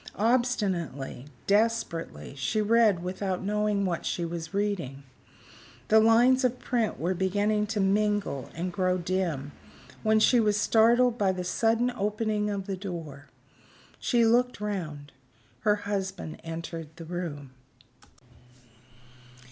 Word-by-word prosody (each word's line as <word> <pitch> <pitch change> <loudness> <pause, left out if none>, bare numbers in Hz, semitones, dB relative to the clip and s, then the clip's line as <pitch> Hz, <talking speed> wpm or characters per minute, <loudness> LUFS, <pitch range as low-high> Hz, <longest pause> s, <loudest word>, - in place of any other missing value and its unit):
Obstinately, 195 - 0 0.2
desperately, 205 -8 0
she 140 +11 -1
read 215 -4 +3
without 185 0 -3
knowing 210 0 0
what 175 -3 -2
she 170 - -2
was 165 -1 -5
reading. 190 -10 -2 0.9
The 220 - +7
lines 240 +4 +5
of 250 0 +1
print 235 -4 -1
were 175 +3 0
beginning 205 +3 +1
to 210 0 -2
mingle 200 - 0
and 175 +2 -3
grow 185 -2 +1
dim, 170 -6 -2 0.5
when 220 0 +3
she 240 +3 +5
was 210 -2 +2
startled 235 +2 +4
by 195 -2 +3
the 185 -1 -4
sudden 230 +6 +1
opening 210 -1 -1
of 200 -2 -3
the 195 -1 -3
door. 165 -7 -7 0.7
She 235 -2 +2
looked 245 +1 +2
round. 160 -9 -4 0.5
Her 210 +9 +3
husband 195 -5 -4
entered 165 -1 -6
the 165 - -9
room. 160 -6 -5
200 Hz, 125 wpm, -28 LUFS, 170-220 Hz, 0.9 s, The